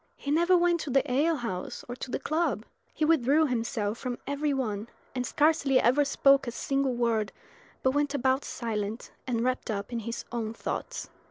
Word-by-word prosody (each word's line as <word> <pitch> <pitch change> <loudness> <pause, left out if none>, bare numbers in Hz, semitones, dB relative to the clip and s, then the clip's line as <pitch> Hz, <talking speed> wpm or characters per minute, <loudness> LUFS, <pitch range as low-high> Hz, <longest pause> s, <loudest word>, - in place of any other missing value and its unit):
He 280 - -4
never 345 +4 +5
went 345 0 +3
to 315 - -4
the 270 +1 +3
ale 305 +6 +3
house 225 -10 -4
or 245 - -5
to 260 - -6
the - - -1
club. 310 -9 -1 0.3
He 310 - 0
withdrew 305 0 +4
himself 225 -4 -1
from 250 -2 -3
every 285 +1 0
one, 220 -6 -2 0.3
and 250 -2 -2
scarcely 295 -3 +3
ever 255 +6 +4
spoke 275 -1 +4
a - - -1
single 275 +1 0
word, 230 -4 +1 0.5
but 260 - +4
went 290 +1 0
about 265 +1 +2
silent 220 -1 -4 0.2
and 235 -3 0
wrapped 255 +1 -1
up 205 +2 -3
in 235 - -1
his 230 +1 -5
own 230 -2 -3
thoughts. - - -4
260 Hz, 185 wpm, -28 LUFS, 230-290 Hz, 0.5 s, never